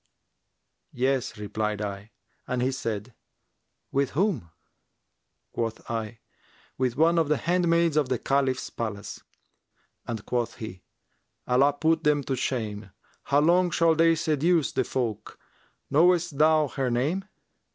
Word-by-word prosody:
'Yes,' 130 -3 -1
replied 105 0 -3
I; 100 0 -5 0.4
and 125 -1 -1
he 130 - +1
said, 115 -3 -4 0.8
'With 140 -1 +1
whom?' 170 - 0 1.0
Quoth 115 -1 -4
I, 115 0 -4 0.5
'With 125 -1 -1
one 165 +2 +4
of 160 - +2
the 150 - +3
handmaids 170 -1 +2
of 145 -4 +2
the 130 - +1
Caliph's 135 0 0
palace;' 105 -3 -5 0.9
and 110 -3 -5
quoth 120 -2 -1
he, 95 -6 -8 0.7
'Allah 135 +3 +4
put 160 +3 +1
them 150 -1 +2
to 135 - -2
shame! 110 -5 -3 0.4
How 145 +1 +3
long 175 +3 +4
shall 165 -1 +3
they 165 +1 +4
seduce 160 0 +1
the - - 0
folk? 120 -5 -3 0.5
Knowest 170 0 +3
thou 155 -1 +4
her 135 -1 -2
name?' 145 +11 0
135 Hz, 130 wpm, -26 LUFS, 115-160 Hz, 1.0 s, one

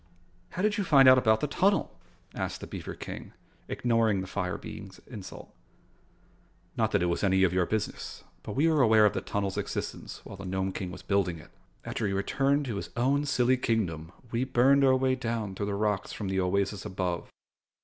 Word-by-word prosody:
"How 185 - -2
did 210 -1 +1
you - - +1
find 140 -7 +6
out 130 0 +8
about 110 -3 +3
the 150 - 0
tunnel?" 195 +7 +1 0.3
asked - - -4
the - - -7
beaver - - -7
King, - - -8 0.3
ignoring 115 -4 +1
the - - -5
fire 90 -1 -3
being's - - -9
insult. - - -10 1.2
"Not - - +1
that - - +2
it 85 - +1
is 85 - -2
any 95 -1 +3
of 90 -2 +3
your 90 -2 +2
business, 110 -1 -4 0.2
but - - -7
we 150 +5 +3
were 155 -3 +3
aware 110 -3 +6
of 105 - +3
the - - -2
tunnel's 100 -1 -2
existence - - -5
while 100 - -9
the 95 - -9
Nome 95 +1 -1
King 95 -1 -4
was 90 0 -9
building 95 -4 0
it. 80 - -15 0.3
After 110 - -2
he 100 - -1
returned 140 +8 +1
to 115 -6 -3
his - - -5
own 140 +4 +2
silly 130 -2 +2
kingdom, 90 -10 -1 0.2
we 120 +2 0
burned 135 +2 +4
our 130 -1 +5
way 130 0 +2
down 115 -5 -3
through 100 +1 -3
the 100 - -2
rocks 105 -1 -1
from 100 -3 -4
the 95 0 0
oasis 95 +2 0
above." 90 -2 -3
105 Hz, 200 wpm, -28 LUFS, 95-130 Hz, 1.2 s, out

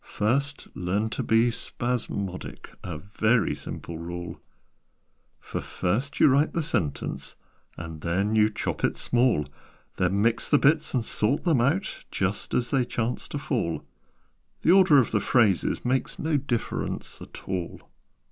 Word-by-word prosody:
First 140 +7 -1
learn 100 +5 -1
to - - -2
be 115 +2 +3
spasmodic 115 -6 -4
A 85 -4 -5
very 105 +3 +1
simple 75 +3 -7
rule. 85 0 -6 1.0
"For - - -5
first 125 +11 -2
you - - +7
write 140 +3 +3
a 165 - +1
sentence, 100 - -2 0.4
And 80 -2 -7
then 95 +6 0
you 110 0 +5
chop 110 - -4
it - - +1
small; 120 - +2 0.5
Then 95 +2 +1
mix 115 0 +2
the 145 - +6
bits, 150 +1 +3
and 120 -3 +1
sort 110 +8 0
them 155 -9 +3
out 155 +11 0
Just 95 +1 -2
as 120 - +1
they 135 -2 +3
chance 120 0 -2
to - - -4
fall: 120 - -2 0.8
The 165 - +5
order 185 -5 +7
of 130 - +3
the 105 - +1
phrases 110 -5 +2
makes 130 +1 0
No 160 0 0
difference 130 -5 -3
at - - -11
all. 90 -3 -3
115 Hz, 145 wpm, -26 LUFS, 95-135 Hz, 1.0 s, you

